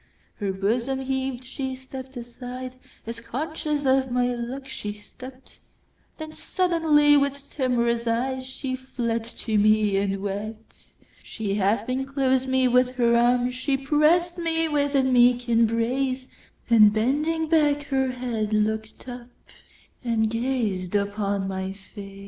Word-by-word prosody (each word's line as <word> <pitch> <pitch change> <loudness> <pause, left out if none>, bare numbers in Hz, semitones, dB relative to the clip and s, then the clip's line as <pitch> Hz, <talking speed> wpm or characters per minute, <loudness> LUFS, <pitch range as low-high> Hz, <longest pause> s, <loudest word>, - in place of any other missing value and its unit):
Her 200 -2 -1
bosom 235 +7 -1
heaved—she 265 0 -3
stepp'd 260 0 -9
aside, 250 +1 -7 0.3
As 230 +1 -6
conscious 300 +3 -3
of 265 0 +3
my 245 0 +1
look 245 +3 -5
she 210 -6 -5
stept—Then 255 +7 -14
suddenly, 320 -5 +3
with 280 0 -1
timorous 235 -3 +1
eyeShe 260 +2 -2
fled 235 -3 -2
to 225 -2 -2
me 210 -1 +3
and 195 0 0
wept. 215 +3 -7 0.3
She 210 -3 -4
half 205 +2 +1
enclosed 265 0 0
me 260 0 +3
with 250 +1 +3
her 235 -2 +3
arms, 245 +1 +3
She 270 +2 -1
press'd 310 +6 +2
me 325 -1 +1
with 285 -2 0
a 270 - +4
meek 245 -1 +4
embrace; 240 +3 +1 0.4
And 215 -3 +7
bending 295 +9 0
back 295 -2 +3
her 265 -1 +1
head, 230 -4 -2
look'd 220 +2 -1
up, 245 -1 -8 0.7
And 225 -2 +1
gazed 230 -6 -1
upon 200 -1 -1
my 190 0 -3
face. 195 0 -11
250 Hz, 125 wpm, -25 LUFS, 220-270 Hz, 0.7 s, And